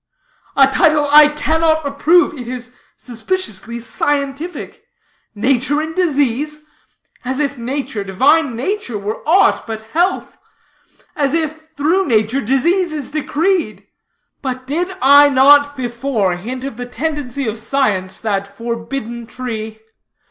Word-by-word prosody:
'" - - -40
"A 275 - +8
title 295 +2 +3
I 300 0 +9
cannot 315 +1 +1
approve; 305 +5 +3
it 250 -4 -8
is 250 0 -7 0.2
suspiciously 235 - -4
scientific. 285 - -3 0.5
'Nature 260 +6 +1
in 315 +1 -4
Disease?' 300 -3 -1 0.6
As 260 +2 -2
if 285 -1 -1
nature, 255 -3 -4
divine 265 - +2
nature, 260 - -3
were 205 +2 -5
aught 380 -5 +3
but 220 -1 -5
health; 355 +4 0 0.8
as 285 0 0
if 315 -1 -3
through 340 +7 +1
nature 225 +2 +1
disease 335 - +1
is 295 -4 -5
decreed! 325 +4 -1 0.6
But 255 -1 -4
did 340 +7 -2
I 285 +2 +7
not 285 +1 +5
before 235 -6 -1
hint 245 +8 -6
of 270 -4 -6
the 245 0 -6
tendency 280 0 -4
of 220 +1 -3
science, 215 -6 -1
that 200 -3 -1
forbidden 230 +2 -5
tree? 220 -3 -6
275 Hz, 125 wpm, -17 LUFS, 235-305 Hz, 0.8 s, I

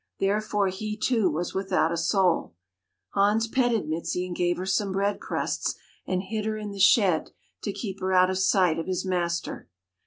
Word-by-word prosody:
Therefore 205 0 +1
he, 210 +3 -4
too, 220 -4 +2
was 170 +3 -3
without 190 -4 +1
a - - 0
soul. 175 - +1 0.6
Hans 210 +3 +3
petted 235 - +1
Mizi 170 +3 -2
and 180 -1 -6
gave 175 0 +1
her 185 - -4
some 195 +1 0
bread 200 +1 0
crusts - - -2 0.3
and 185 0 -1
hid 210 +2 -3
her 215 0 -1
in 210 -1 -5
the 200 - -8
shed 195 - +4 0.3
to 205 - -2
keep 195 -1 -6
her 190 0 -1
out 185 0 +5
of 190 - -1
sight 185 -4 +3
of 165 - -4
his 185 0 -2
master. 175 - -2
190 Hz, 185 wpm, -26 LUFS, 180-210 Hz, 0.6 s, out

